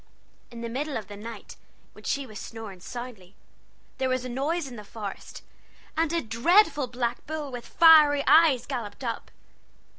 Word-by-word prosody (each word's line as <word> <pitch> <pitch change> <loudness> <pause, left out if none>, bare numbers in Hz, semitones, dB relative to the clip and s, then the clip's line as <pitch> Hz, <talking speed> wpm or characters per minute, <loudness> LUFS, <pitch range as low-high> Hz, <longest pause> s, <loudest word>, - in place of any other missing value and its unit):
In 235 -1 -9
the 235 - -3
middle 275 +5 -3
of 210 -3 -8
the 205 - -8
night, 215 +1 -9 0.4
when - - -15
she 280 -1 -1
was 215 -4 -9
snoring 220 -5 -8
soundly, 220 -3 -9 0.6
there 260 -1 +1
was 255 -1 -1
a - - -4
noise 290 +7 -1
in 250 - -9
the 210 - -9
forest, 205 -1 -8 0.5
and 325 0 +1
a 335 0 0
dreadful 290 - +3
black 240 -1 -3
bull 305 -2 -4
with 245 -1 -7
fiery 305 -3 +7
eyes 290 -7 +5
galloped 235 -4 -5
up. 235 -2 -4
250 Hz, 170 wpm, -27 LUFS, 225-290 Hz, 0.6 s, fiery